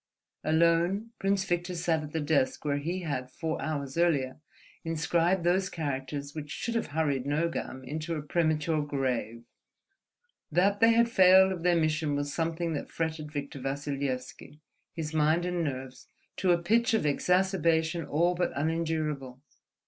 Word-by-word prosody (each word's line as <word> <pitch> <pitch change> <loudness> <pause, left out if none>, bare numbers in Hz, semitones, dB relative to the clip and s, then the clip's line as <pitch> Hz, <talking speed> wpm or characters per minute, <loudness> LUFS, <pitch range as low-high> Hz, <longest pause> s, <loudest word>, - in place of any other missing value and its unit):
Alone, 170 +7 +2
Prince 195 0 +1
Victor 175 0 -1
sat 165 -2 0
at 150 -1 -8
the 160 - -1
desk 145 -2 0
where 145 -1 +1
he 175 +6 -3
had, 130 -5 -3
four 160 +4 -4
hours 145 -1 -3
earlier, 145 -6 +1 0.4
inscribed 170 +2 +1
those 185 +2 +2
characters 140 -2 -4
which 150 -2 -6
should 225 +11 -3
have 230 - -1
hurried 145 -3 -1
Nogam 145 -3 -2
into 155 +5 -4
a 150 - -4
premature 155 0 +1
grave. 130 -5 -2 1.1
That 195 +5 +3
they 230 0 +6
had 235 +1 +4
failed 190 -3 +6
of 180 -3 -4
their 175 0 +3
mission 155 -2 +1
was 145 0 -2
something 165 0 -1
that 145 - -4
fretted 160 -2 -3
Victor 140 -1 -5
Vassilyevski, 140 0 -4 0.3
his 160 -2 -5
mind 155 +3 +2
and 180 -1 -1
nerves, 130 -3 -5 0.3
to 185 - 0
a 175 - +5
pitch 225 +7 +2
of 220 - 0
exacerbation 170 0 +2
all 170 +4 +1
but 175 0 -1
unendurable. 155 -4 -2
160 Hz, 150 wpm, -29 LUFS, 145-175 Hz, 1.1 s, they